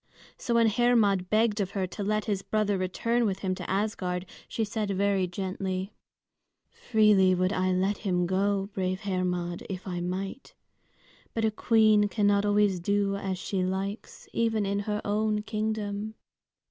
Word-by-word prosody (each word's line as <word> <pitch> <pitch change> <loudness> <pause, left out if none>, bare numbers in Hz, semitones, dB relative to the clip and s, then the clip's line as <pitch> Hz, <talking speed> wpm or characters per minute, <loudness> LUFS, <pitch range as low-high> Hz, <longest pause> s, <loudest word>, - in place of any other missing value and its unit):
So 235 - -2
when 230 0 +5
Hermod 220 -5 +3
begged 215 -1 +2
of 190 - -1
her 190 - +1
to 195 +3 -6
let 215 +1 0
his 200 -3 -1
brother 205 +1 0
return 230 +6 0
with 190 -2 -1
him 190 -2 0
to - - -6
Asgard, 190 -3 -1 0.2
she 225 - -2
said 210 0 -3
very 195 -1 +1
gently, 190 +1 -4 0.8
"Freely 210 -5 +4
would 185 +2 +1
I 185 0 +1
let 190 +2 0
him 180 -4 0
go, 195 +2 0
brave 185 +1 -2
Hermod, 180 -3 -2
if 185 -2 -5
I 180 -2 -3
might. 190 +8 -5 0.8
But 225 -1 +1
a 220 - +2
queen 215 -1 +4
cannot 205 -1 +2
always 205 -2 +3
do 200 +2 +1
as 195 -2 -3
she 185 +1 -2
likes, 195 +3 -4
even 225 -2 +1
in 200 +1 0
her 210 +1 -2
own 210 0 0
kingdom. 215 -1 -3
200 Hz, 160 wpm, -28 LUFS, 185-215 Hz, 0.8 s, when